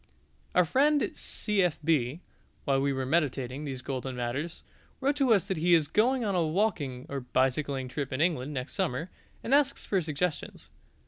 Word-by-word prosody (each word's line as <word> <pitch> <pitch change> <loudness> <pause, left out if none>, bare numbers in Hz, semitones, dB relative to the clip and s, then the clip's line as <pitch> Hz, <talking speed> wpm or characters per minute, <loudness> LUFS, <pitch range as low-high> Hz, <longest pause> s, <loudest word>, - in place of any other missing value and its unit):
Our 180 - +5
friend 290 - +2
C.F.B., 165 - 0 0.4
while 135 -2 +2
we 140 0 +1
were 130 -1 -2
meditating 140 -2 0
these 130 -3 -5
golden 130 -1 -4
matters, 125 +7 -3 0.4
wrote 275 +2 +1
to 270 -4 +3
us 200 -4 +4
that 190 -3 -2
he 170 +2 +4
is 155 -3 +2
going 245 - +2
on 200 - 0
a 175 -2 +2
walking 155 - -1
or 140 - -3
bicycling 130 +1 0
trip 135 +2 -4
in 130 - -2
England 150 -4 +1
next 130 -3 -4
summer, 145 +9 -2 0.3
and 250 - -1
asks 280 -1 +3
for 195 -2 +1
suggestions. 155 +1 -3
155 Hz, 170 wpm, -29 LUFS, 130-190 Hz, 0.4 s, Our